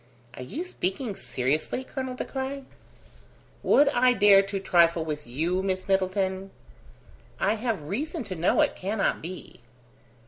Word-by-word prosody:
"Are - - -9
you 275 - -5
speaking 210 - -3
seriously, 150 - -2
Colonel 260 -1 -5
De - - -4
Craye?" 270 +1 -4 1.0
"Would 290 - +5
I 250 -2 +4
dare 205 -4 +7
to 195 0 -4
trifle 170 -3 +3
with 150 -3 -5
you, 165 +9 -1
Miss 190 0 -2
Middleton?" 190 0 0 0.9
"I 200 - +2
have 225 -6 -2
reason 285 - -3
to 190 -4 -6
know 170 +1 +2
it - - +2
cannot 200 +2 -1
be." 180 -3 -9
195 Hz, 140 wpm, -26 LUFS, 175-250 Hz, 1.0 s, dare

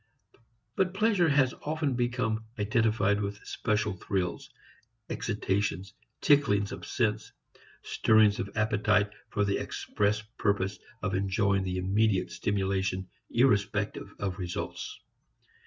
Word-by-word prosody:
But 185 -1 +1
pleasure 200 -5 +3
has 140 -3 +3
often 155 -2 -1
become 120 -2 0
identified 105 -1 +2
with 100 0 -3
special 105 -1 0
thrills, 95 -1 -3 0.6
excitations, 95 -3 -1 0.3
ticklings 105 -9 +4
of - - -7
sense, 105 -3 0 0.5
stirrings 110 -2 +4
of 100 - -2
appetite 105 -1 +2 0.2
for 105 -2 +1
the 100 - 0
express 105 0 -1 0.2
purpose 100 -1 0 0.2
of 95 -2 -1
enjoying 95 +1 +1
the 95 -1 -2
immediate 95 0 +1
stimulation 95 0 -1 0.2
irrespective 105 -4 +1
of 100 -2 -3
results. 90 -1 -5
105 Hz, 105 wpm, -29 LUFS, 95-110 Hz, 0.6 s, ticklings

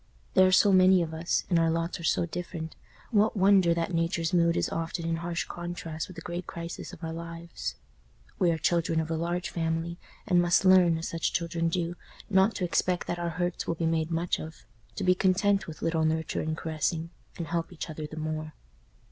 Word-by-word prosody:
There 185 0 +6
are - - +3
so 195 +2 +6
many 185 -1 +6
of 160 -1 -5
us, 160 +2 0
and 175 -3 +3
our 165 0 +3
lots 165 +2 -1
are - - -8
so 165 - +2
different, 170 -1 -6 0.4
what 215 0 +3
wonder 190 -2 +5
that 170 +2 -2
Nature's 165 0 0
mood 170 -1 +3
is - - +1
often 165 0 -3
in 165 0 0
harsh 170 0 -2
contrast 175 -2 -5
with 185 - -11
the 165 - -8
great 175 0 -5
crisis 170 0 -6
of 180 -3 -12
our 160 0 -3
lives? 170 - -6 0.6
We 180 - +4
are 165 - +1
children 165 0 +1
of 160 0 -2
a - - +1
large 175 +2 -2
family, 165 +1 -2 0.3
and 180 -4 +4
must 175 +2 +3
learn, 180 -3 +6
as 165 - -4
such 165 -1 -1
children 170 -1 0
do, 170 0 -1 0.4
not 190 +3 +4
to 185 - -1
expect 180 +1 0
that 175 - -3
our 170 0 -1
hurts 175 +1 -2
will 170 - 0
be 165 - -2
made 160 -1 +1
much 170 +1 0
of—to 115 -8 -10
be 180 - +5
content 195 +2 +2
with 160 - -8
little 165 -1 +1
nurture 160 0 0
and 155 0 -2
caressing, 160 +1 -2 0.3
and 170 - -3
help 165 +1 -2
each 180 - -6
other 155 -1 -6
the 155 - -10
more. 155 0 -4
170 Hz, 210 wpm, -28 LUFS, 160-180 Hz, 0.6 s, There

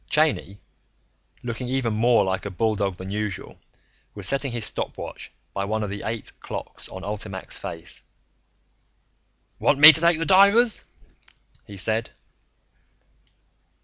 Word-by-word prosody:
Cheyney, 150 -10 +1 0.9
looking 120 +1 -4
even 130 -3 -1
more 115 0 +3
like 95 +1 -2
a - - -4
bulldog 100 -1 -1
than 95 +2 -8
usual, 105 -3 -5 0.6
was 100 -3 -3
setting 140 -1 -1
his 120 -2 0
stopwatch - - -4 0.2
by 100 - -2
one 110 +2 -2
of 100 - -4
the 100 - -5
eight 110 0 -3
clocks - - -5
on 95 -1 -9
ULTIMAC's 100 -2 -5
face. 80 -1 -7 1.6
"Want 145 - +3
me 155 +2 +11
to 160 - +4
take 170 -1 +4
the 165 - -2
divers?" 200 +5 +4 0.8
he 100 - -10
said. 110 +4 +1
110 Hz, 130 wpm, -24 LUFS, 100-135 Hz, 1.6 s, me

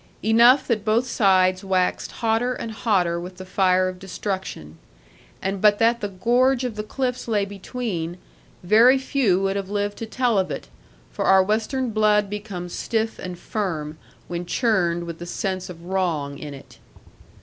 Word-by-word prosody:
Enough 235 +5 +6
that 220 -4 0
both 225 +3 +2
sides 185 -5 +3
waxed 185 -2 0
hotter 230 +3 +1
and 230 - -5
hotter 195 -5 +1
with 180 +1 -8
the 185 - -8
fire 185 -1 +2
of 185 0 -6
destruction. 190 - -5 0.6
And 195 0 -2
but 210 -1 +5
that 230 +2 +2
the 205 - -1
gorge 245 +7 +2
of 245 -4 -3
the 210 - -3
cliffs 250 +3 -3
lay 210 -3 +1
between, 195 -4 -5 0.5
very 230 +8 +6
few 260 -8 +1
would 195 0 0
have 195 -1 -4
lived 205 0 -2
to 225 - -5
tell 240 -2 +1
of 190 - -1
it; - - -6 0.4
for - - -3
our 190 0 +6
western 225 +5 -1
blood 210 -2 +2
becomes 200 -4 -6
stiff 225 -1 -2
and 180 -1 -6
firm, 160 -7 -4 0.3
when 175 0 -5
churned 175 -7 +1
with 170 -1 -7
the 175 - -7
sense 185 +1 -3
of 170 -1 -10
wrong 165 -7 -1
in 145 -2 -7
it. 135 - -15
200 Hz, 170 wpm, -23 LUFS, 180-225 Hz, 0.6 s, Enough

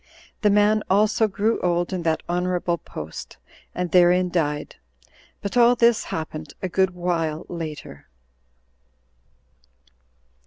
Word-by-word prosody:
The 210 - +4
man 210 +1 +3
also 210 +3 +3
grew 215 +3 0
old 175 +1 0
in 185 - -2
that 160 -1 0
honorable 175 -1 -1
post, 80 +1 -9 0.4
and 180 -2 -2
therein 180 +1 +4
died. 150 -4 -2 0.7
But 200 - -4
all 245 0 +6
this 235 -1 +3
happened 155 -2 -6
a 185 - -3
good 190 0 +1
while 165 -3 -2
later. 155 - -7
180 Hz, 115 wpm, -23 LUFS, 165-200 Hz, 0.7 s, all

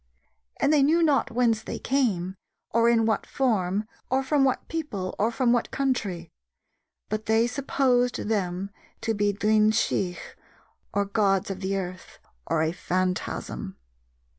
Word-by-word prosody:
And 300 - +3
they 295 - +5
knew 320 +5 +4
not 295 -4 +3
whence 230 -2 +2
they - - -5
came, 205 -10 0 0.4
or 230 +1 +4
in 230 -1 +3
what 220 -1 0
form, 210 -5 0 0.2
or 265 +1 +1
from 275 +1 +2
what 265 -1 +1
people, 250 - -4
or 215 - +3
from 240 0 +2
what 240 - 0
country; 200 - -2 0.8
but 215 0 -4
they 220 +1 +4
supposed 250 -1 +1
them 195 -2 -1 0.3
to 225 - 0
be 205 -1 +1
Duine 215 +1 +3
Sidh, 195 -5 0 0.7
or 200 0 +1
gods 195 -1 +1
of 190 - -5
the 195 0 -1
earth, 185 -1 -6 0.3
or 160 - +1
a 160 - +1
phantasm." 180 - -3
220 Hz, 145 wpm, -26 LUFS, 190-250 Hz, 0.8 s, they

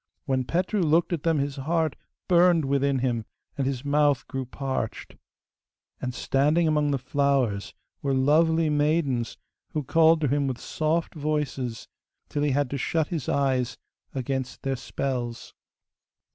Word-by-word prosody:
When 130 -3 0
Petru 185 - 0
looked 165 +2 +3
at 165 - -1
them 165 -1 +2
his 140 0 -2
heart 160 +2 0 0.3
burned 175 -3 +5
within 140 0 +1
him, 120 -3 0 0.3
and 135 -2 -1
his 135 0 -3
mouth 145 -2 +2
grew 135 -2 -4
parched. 130 -4 -4 0.9
And 125 - -2
standing 150 +5 +2
among 150 -1 +2
the 140 - +1
flowers 130 -6 0 0.3
were 140 -1 0
lovely 160 +4 +3
maidens 145 -5 +1 0.4
who 150 - -1
called 160 +3 +4
to 150 - +2
him 140 +1 +1
in 130 - -2
soft 160 +6 -1
voices, 145 -6 -2 0.4
till 145 - -2
he 145 - +2
had 140 -1 0
to 140 - -2
shut 160 +2 0
his 160 -8 -3
eyes 130 -3 +1 0.4
against 130 0 -3
their 135 0 0
spells. 125 -2 -4
140 Hz, 145 wpm, -26 LUFS, 130-155 Hz, 0.9 s, burned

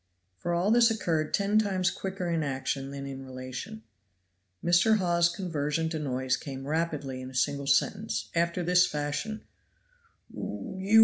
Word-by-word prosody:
For 170 - -1
all 180 +5 +2
this 235 0 +6
occurred 165 -8 0
ten 205 +1 +3
times 190 -4 +1
quicker 190 -2 -4
in 165 -1 +1
action 135 -1 -2
than 140 0 -6
in 135 -1 -6
relation. 130 -4 -7 0.8
Mr. 175 +6 +5
Hawes's 170 -3 +3
conversion 160 -3 -1
to 160 -1 -3
noise 130 -3 0
came 135 -2 -7
rapidly 150 -4 -1
in 130 - -7
a 130 - -12
single 140 +1 0
sentence, 200 +9 +1
after 170 +1 +1
this 180 +1 +5
fashion: 150 +9 -3 0.5
" 465 -2 -28
you! 195 +4 +1
165 Hz, 150 wpm, -29 LUFS, 140-190 Hz, 0.8 s, this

